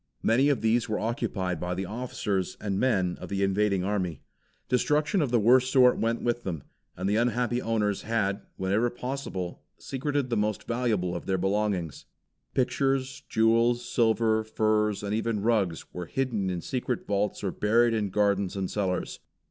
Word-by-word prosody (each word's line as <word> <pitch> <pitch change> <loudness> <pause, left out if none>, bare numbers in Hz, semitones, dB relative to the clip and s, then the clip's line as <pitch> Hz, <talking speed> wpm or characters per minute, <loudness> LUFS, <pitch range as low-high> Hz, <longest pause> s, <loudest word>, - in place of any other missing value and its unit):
Many 130 +6 +4
of 140 - +1
these 115 +1 +2
were 105 - 0
occupied 95 -6 -2
by 90 +2 -2
the 95 +1 -3
officers 100 -4 -3
and 100 -2 -2
men 95 -9 +1
of - - -7
the 100 0 -1
invading 100 -1 +1
army. 95 -6 -2 0.4
Destruction 150 +8 +2
of 145 - 0
the 120 -1 +3
worst 125 +4 +4
sort 125 -2 +5
went 115 +1 0
with 120 0 0
them, 85 - -4 0.3
and 95 +2 -2
the 105 +2 +2
unhappy 120 +1 +1
owners 105 -3 0
had, 105 -3 -1 0.2
whenever 100 +6 +1
possible, 125 -8 -5 0.2
secreted 135 -1 -2
the - - +2
most 105 0 -1
valuable 110 -7 0
of 85 - -6
their 95 - +1
belongings. 95 -4 -1 0.5
Pictures, 135 +1 0
jewels, 115 +2 +3
silver, 110 -2 +2
furs 110 -1 +1
and 100 0 -2
even 110 -2 -1
rugs 105 -8 +1
were 90 -1 -5
hidden 115 -7 -1
in 90 -2 -3
secret 125 +2 -3
vaults 105 0 -1
or 95 - 0
buried 115 +4 +3
in 105 -3 0
gardens 100 -1 +1
and 95 -2 -2
cellars. 95 -3 -2
110 Hz, 165 wpm, -27 LUFS, 95-120 Hz, 0.5 s, sort